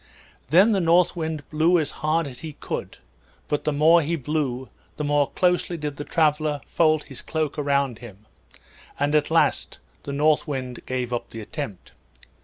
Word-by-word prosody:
Then 185 Hz, +9 st, +6 dB
the 195 Hz, -3 st, +2 dB
North 175 Hz, +2 st, +4 dB
Wind 160 Hz, -3 st, -4 dB
blew 160 Hz, +3 st, +3 dB
as 155 Hz, -3 st, -1 dB
hard 155 Hz, +2 st, +1 dB
as 130 Hz, -3 st, -8 dB
he 160 Hz, -2 st, -7 dB
could, -, -, -6 dB, 0.5 s
but 150 Hz, -, -2 dB
the 150 Hz, -, +2 dB
more 160 Hz, +4 st, +5 dB
he 165 Hz, +2 st, -1 dB
blew 135 Hz, -3 st, -2 dB, 0.3 s
the 150 Hz, -, -2 dB
more 145 Hz, -1 st, +2 dB
closely 180 Hz, -1 st, +1 dB
did 150 Hz, -2 st, -5 dB
the 145 Hz, -, -4 dB
traveler 150 Hz, -2 st, +1 dB
fold 155 Hz, -2 st, +2 dB
his 135 Hz, -, -10 dB
cloak 155 Hz, -2 st, -2 dB
around 140 Hz, -4 st, 0 dB
him; 105 Hz, -3 st, -12 dB, 0.7 s
and 145 Hz, +1 st, +1 dB
at 150 Hz, -1 st, +2 dB
last 165 Hz, 0 st, +1 dB, 0.2 s
the 140 Hz, -, -6 dB
North 150 Hz, +2 st, +2 dB
Wind 130 Hz, -4 st, -4 dB
gave 125 Hz, -1 st, -2 dB
up 120 Hz, -, -3 dB
the 115 Hz, -, -8 dB
attempt. 110 Hz, -, -7 dB
150 Hz, 175 wpm, -24 LUFS, 140-160 Hz, 0.7 s, Then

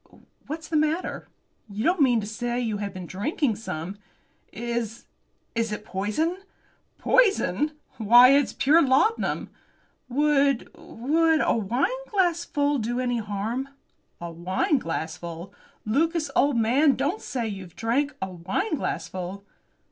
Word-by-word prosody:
What's 315 Hz, +2 st, -5 dB
the 315 Hz, -, 0 dB
matter? 310 Hz, +4 st, -1 dB, 0.4 s
You 205 Hz, +2 st, -4 dB
don't 350 Hz, +3 st, +2 dB
mean 245 Hz, -4 st, +4 dB
to -, -, -5 dB
say 240 Hz, +3 st, -3 dB
you 225 Hz, -4 st, -1 dB
have 200 Hz, -1 st, -4 dB
been 185 Hz, -2 st, -7 dB
drinking 230 Hz, -, -1 dB
some?" 195 Hz, -2 st, -6 dB, 0.5 s
"Is 235 Hz, 0 st, -4 dB, 0.5 s
is 230 Hz, -2 st, -1 dB
it 210 Hz, 0 st, -5 dB
poison?" 215 Hz, -, -1 dB, 0.6 s
"Poison! 310 Hz, -, +2 dB, 0.3 s
Why, 240 Hz, +4 st, +8 dB
it's 280 Hz, 0 st, +3 dB
pure 300 Hz, +5 st, +4 dB
laudanum!" 285 Hz, +12 st, +1 dB, 0.6 s
"Would 280 Hz, -1 st, +2 dB
would 320 Hz, +6 st, +1 dB
a -, -, +2 dB
wineglassful 330 Hz, -, 0 dB
do 240 Hz, +2 st, -2 dB
any 245 Hz, -2 st, 0 dB
harm?" 220 Hz, +6 st, -3 dB, 0.5 s
"A 170 Hz, -1 st, -6 dB
wineglassful! 170 Hz, -, -2 dB, 0.3 s
Lucas, 305 Hz, +6 st, +1 dB
old 280 Hz, -3 st, +3 dB
man, 265 Hz, +6 st, +4 dB
don't 290 Hz, +10 st, -1 dB
say 240 Hz, -3 st, -3 dB
you've 190 Hz, -5 st, -7 dB
drank 270 Hz, +6 st, 0 dB
a 190 Hz, -, -4 dB
wineglassful!" 190 Hz, -, -3 dB
245 Hz, 120 wpm, -25 LUFS, 205-300 Hz, 0.6 s, Why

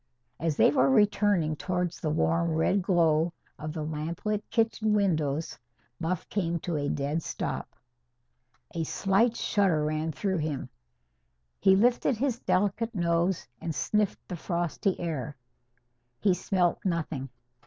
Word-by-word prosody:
As 165 Hz, -3 st, -1 dB
they -, -, +6 dB
were 135 Hz, -2 st, +3 dB
returning 200 Hz, -1 st, +3 dB
towards 180 Hz, +1 st, -2 dB
the 155 Hz, -, -1 dB
warm 165 Hz, +2 st, +1 dB
red 190 Hz, +5 st, +2 dB
glow 170 Hz, -2 st, +2 dB, 0.3 s
of 155 Hz, 0 st, -4 dB
the 155 Hz, -1 st, -4 dB
lamplit 165 Hz, +7 st, -3 dB
kitchen 225 Hz, -2 st, +1 dB
windows, 160 Hz, -6 st, 0 dB, 0.4 s
Buff 165 Hz, +1 st, -2 dB
came 170 Hz, -4 st, -1 dB
to 175 Hz, -, -3 dB
a 145 Hz, -1 st, -1 dB
dead 145 Hz, +3 st, -1 dB
stop. -, -, -4 dB, 1.0 s
A 165 Hz, -2 st, -1 dB
slight 200 Hz, +8 st, +2 dB
shudder 180 Hz, -7 st, +2 dB
ran 155 Hz, +1 st, -1 dB
through 185 Hz, +4 st, -1 dB
him. 145 Hz, -4 st, -3 dB, 0.9 s
He 190 Hz, 0 st, +5 dB
lifted 240 Hz, +3 st, +3 dB
his 250 Hz, -1 st, 0 dB
delicate 205 Hz, +4 st, 0 dB
nose 170 Hz, 0 st, +1 dB, 0.2 s
and 165 Hz, -2 st, -3 dB
sniffed 210 Hz, +6 st, 0 dB
the 180 Hz, -, -4 dB
frosty 175 Hz, +3 st, -1 dB
air. 150 Hz, -4 st, -4 dB, 0.8 s
He 200 Hz, -3 st, +3 dB
smelt 180 Hz, 0 st, +1 dB
nothing. 160 Hz, -7 st, -2 dB
170 Hz, 130 wpm, -28 LUFS, 155-200 Hz, 1.0 s, they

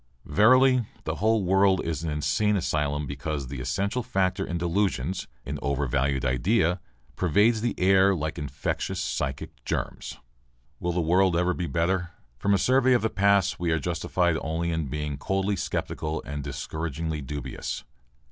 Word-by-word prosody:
Verily, 125 Hz, -, +5 dB, 0.2 s
the 80 Hz, +1 st, -3 dB
whole 110 Hz, +1 st, +2 dB
world 95 Hz, 0 st, +4 dB
is 80 Hz, -1 st, -2 dB
an 80 Hz, -, -2 dB
insane 75 Hz, +8 st, +1 dB
asylum 75 Hz, -5 st, 0 dB
because 70 Hz, +1 st, -4 dB
the 70 Hz, -2 st, -5 dB
essential 100 Hz, -, -1 dB
factor 95 Hz, -6 st, 0 dB
in 85 Hz, -, -3 dB
delusions, 95 Hz, +1 st, -1 dB, 0.2 s
an -, -, -4 dB
overvalued 70 Hz, -1 st, 0 dB
idea, 85 Hz, -, +2 dB, 0.4 s
pervades 105 Hz, +6 st, +3 dB
the 120 Hz, 0 st, -2 dB
air 95 Hz, +1 st, +5 dB
like 80 Hz, -1 st, -3 dB
infectious 75 Hz, -1 st, -3 dB
psychic -, -, -3 dB
germs. -, -, -4 dB, 0.6 s
Will 90 Hz, -, -1 dB
the 85 Hz, +1 st, 0 dB
world 90 Hz, +2 st, +3 dB
ever 90 Hz, +1 st, +2 dB
be 90 Hz, -2 st, -3 dB
better? 85 Hz, +2 st, 0 dB, 0.3 s
From 100 Hz, 0 st, +3 dB
a -, -, +3 dB
survey 130 Hz, +5 st, +4 dB
of 120 Hz, -, +2 dB
the 110 Hz, -, +1 dB
past 100 Hz, -1 st, +3 dB
we 85 Hz, -1 st, 0 dB
are 80 Hz, -, +2 dB
justified 85 Hz, 0 st, 0 dB
only 80 Hz, +2 st, -1 dB
in 80 Hz, -3 st, -1 dB
being 75 Hz, +1 st, -4 dB
coldly 95 Hz, +3 st, 0 dB
sceptical 80 Hz, -3 st, -3 dB
and 70 Hz, 0 st, -5 dB
discouragingly 80 Hz, +2 st, -4 dB
dubious. 70 Hz, 0 st, -5 dB
85 Hz, 155 wpm, -26 LUFS, 75-100 Hz, 0.6 s, Verily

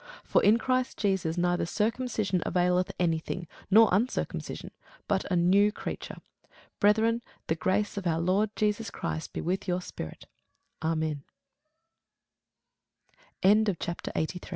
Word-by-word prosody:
For -, -, +2 dB
in 215 Hz, +3 st, +6 dB
Christ 255 Hz, +1 st, 0 dB
Jesus 190 Hz, -5 st, 0 dB
neither 175 Hz, -1 st, +1 dB
circumcision 215 Hz, -2 st, 0 dB
availeth 180 Hz, 0 st, +1 dB
any 165 Hz, -3 st, +2 dB
thing, 170 Hz, +1 st, -5 dB, 0.2 s
nor 220 Hz, +3 st, +7 dB
uncircumcision, 220 Hz, +8 st, -2 dB, 0.4 s
but 195 Hz, -1 st, -1 dB
a -, -, +3 dB
new 195 Hz, +4 st, +4 dB
creature. -, -, -6 dB, 0.6 s
Brethren, 220 Hz, +3 st, +3 dB, 0.2 s
the -, -, +1 dB
grace 190 Hz, +6 st, 0 dB
of 190 Hz, -3 st, -2 dB
our 165 Hz, -1 st, +1 dB
Lord 190 Hz, +5 st, +2 dB
Jesus 210 Hz, 0 st, 0 dB
Christ 160 Hz, -, -4 dB
be -, -, -4 dB
with 185 Hz, +3 st, -2 dB
your 180 Hz, 0 st, +1 dB
spirit. 80 Hz, -, -8 dB, 0.6 s
Amen. 155 Hz, -2 st, -1 dB, 2.2 s
CHAPTER 200 Hz, -3 st, +2 dB
84 175 Hz, +3 st, -3 dB
190 Hz, 125 wpm, -28 LUFS, 175-210 Hz, 2.2 s, nor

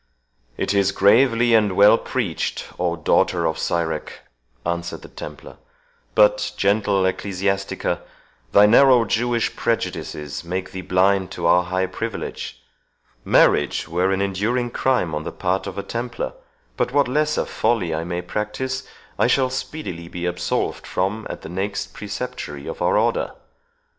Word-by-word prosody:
"It -, -, 0 dB
is 100 Hz, -1 st, +3 dB
gravely 115 Hz, +4 st, +4 dB
and 105 Hz, -3 st, +4 dB
well 100 Hz, +3 st, +7 dB
preached, 110 Hz, -11 st, -2 dB
O 90 Hz, -1 st, 0 dB
daughter 80 Hz, -, +2 dB
of 80 Hz, 0 st, -1 dB
Sirach!" 80 Hz, -2 st, -2 dB, 0.4 s
answered 85 Hz, 0 st, -3 dB
the -, -, -9 dB
Templar; -, -, -9 dB, 0.6 s
"but, -, -, +4 dB
gentle 100 Hz, -1 st, +2 dB
Ecclesiastics, 95 Hz, +1 st, -2 dB, 0.7 s
thy 100 Hz, -, +7 dB
narrow 125 Hz, +2 st, +6 dB
Jewish 120 Hz, +1 st, 0 dB
prejudices 75 Hz, -10 st, -3 dB
make 90 Hz, +2 st, -4 dB
thee 95 Hz, -, -5 dB
blind 95 Hz, +1 st, +2 dB
to 85 Hz, -, -4 dB
our 90 Hz, +1 st, +4 dB
high 95 Hz, +1 st, 0 dB
privilege. -, -, -5 dB, 0.6 s
Marriage 75 Hz, -, +3 dB
were 90 Hz, +3 st, +1 dB
an 95 Hz, 0 st, +1 dB
enduring 110 Hz, +6 st, -1 dB
crime 125 Hz, -13 st, +1 dB
on 75 Hz, -, -2 dB
the -, -, -5 dB
part 95 Hz, +1 st, -1 dB
of 95 Hz, -, -6 dB
a 100 Hz, -, -3 dB
Templar; 120 Hz, 0 st, -4 dB, 0.4 s
but -, -, 0 dB
what 140 Hz, 0 st, +3 dB
lesser 150 Hz, +4 st, +1 dB
folly 95 Hz, -9 st, 0 dB
I 80 Hz, +1 st, -2 dB
may 85 Hz, +1 st, -3 dB
practise, 130 Hz, +8 st, -3 dB, 0.3 s
I -, -, +4 dB
shall 130 Hz, -2 st, +2 dB
speedily 130 Hz, -, -5 dB
be 90 Hz, +1 st, -5 dB
absolved 90 Hz, 0 st, -2 dB
from 100 Hz, +4 st, -2 dB
at -, -, -7 dB
the -, -, -7 dB
next 100 Hz, +3 st, -3 dB
Preceptory 105 Hz, -, -6 dB
of -, -, -6 dB
our -, -, +3 dB
Order. -, -, +1 dB
100 Hz, 145 wpm, -22 LUFS, 90-120 Hz, 0.7 s, well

